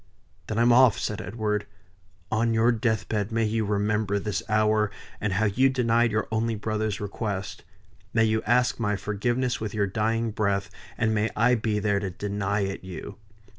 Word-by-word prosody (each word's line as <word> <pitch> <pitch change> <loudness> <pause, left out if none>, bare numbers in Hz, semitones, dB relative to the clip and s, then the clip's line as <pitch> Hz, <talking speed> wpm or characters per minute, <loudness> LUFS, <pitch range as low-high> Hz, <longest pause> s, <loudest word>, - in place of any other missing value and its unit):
"Then 110 - -3
I'm 120 +1 +5
off!" 125 -2 +6
said 105 0 -3
Edward. 105 +1 -2 0.6
"On 115 +1 +1
your 115 +2 +4
deathbed 110 -2 -1
may 115 0 +1
you 110 0 0
remember 105 0 0
this 105 0 -2
hour, 110 0 +3 0.3
and 105 -2 -1
how 110 +4 +2
you 130 +7 +3
denied 120 -2 +2
your 110 +1 0
only 110 +1 0
brother's 110 -1 -2
request. 100 -1 -4 0.5
May 115 - +3
you 110 0 +2
ask 125 +2 +2
my 105 -3 0
forgiveness 120 +6 -1
with 110 -1 -4
your 105 -1 +2
dying 115 +3 0
breath, 100 -2 -1 0.3
and 110 -1 +1
may 110 +1 +1
I 120 +3 +4
be 110 -2 0
there 100 -1 +1
to 100 -1 -3
deny 100 +2 -2
it 95 -1 -3
you." 95 +2 -8
110 Hz, 170 wpm, -26 LUFS, 105-115 Hz, 0.6 s, off